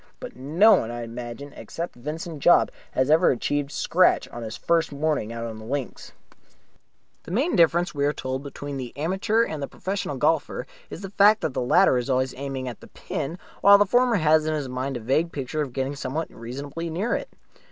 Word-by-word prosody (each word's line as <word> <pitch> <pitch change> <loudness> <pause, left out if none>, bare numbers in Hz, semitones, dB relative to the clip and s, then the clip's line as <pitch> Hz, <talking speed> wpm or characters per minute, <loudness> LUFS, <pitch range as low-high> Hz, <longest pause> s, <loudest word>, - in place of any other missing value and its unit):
But - - -8
no 165 - +4
one, 110 - -2
I 120 0 -5
imagine, 120 +4 -7
except 170 +1 -6
Vincent 155 +5 -6
Jopp, 175 - +5 0.2
has 130 +3 +1
ever 165 +3 +5
achieved 145 +3 -1
scratch 180 +4 +2
on 120 - -8
his 110 -1 -6
first 165 -2 +1
morning 145 -6 -1
on 115 -1 -5
the - - -10
links. 135 +3 -5 1.1
The - - -13
main 260 - +1
difference, 170 +1 +3
we 140 -1 -1
are - - +2
told, 130 -2 -4
between 140 0 -6
the 125 -1 -7
amateur 190 +8 +1
and 155 -9 -4
the 140 - -3
professional 190 -7 -4
golfer 150 +4 0 0.2
is - - -8
the 195 -2 -7
fact 205 +2 +5
that 160 -5 -2
the - - -1
latter 125 +1 +4
is 125 - -5
always 130 0 +1
aiming 135 -1 -5
at 120 - -6
the - - -13
pin, 160 +6 -5 0.2
while 200 0 +8
the 205 - +4
former 245 +3 +3
has 155 -3 +3
in 155 - 0
his 145 -3 -3
mind 130 +1 -3
a - - -8
vague 155 +9 +1
picture 145 +1 -3
of 140 -4 -3
getting 135 +2 -2
somewhere 140 +4 -3
reasonably 140 +8 -6
near 190 +9 -1
it. - - -3
145 Hz, 205 wpm, -25 LUFS, 130-170 Hz, 1.1 s, while